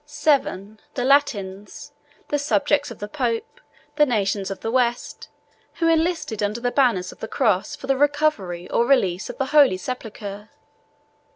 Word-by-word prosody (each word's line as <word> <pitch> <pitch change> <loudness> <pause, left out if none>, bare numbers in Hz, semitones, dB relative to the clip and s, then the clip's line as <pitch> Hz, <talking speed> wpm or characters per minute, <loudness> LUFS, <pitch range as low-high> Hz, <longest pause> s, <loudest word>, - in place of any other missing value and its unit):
VII. 215 -8 +1 0.2
The 245 - -1
Latins; 210 -4 0 0.4
the 290 - 0
subjects 290 0 +1
of 235 - -9
the 205 - -6
pope, 245 - -3 0.4
the 300 - +6
nations 200 -4 0
of 195 - -6
the 225 - -3
West, 240 -1 -1 0.5
who 330 - 0
enlisted 325 - 0
under 210 +3 -1
the 245 +1 -1
banner 245 -9 +3
of - - -16
the 220 - -5
cross 220 +1 0
for 295 - -10
the 270 0 +2
recovery 280 - 0
or 235 - +2
relief 190 -9 +2
of - - -7
the 270 - 0
holy 280 -10 +6
sepulchre. 210 -2 -7
240 Hz, 160 wpm, -23 LUFS, 205-290 Hz, 0.5 s, the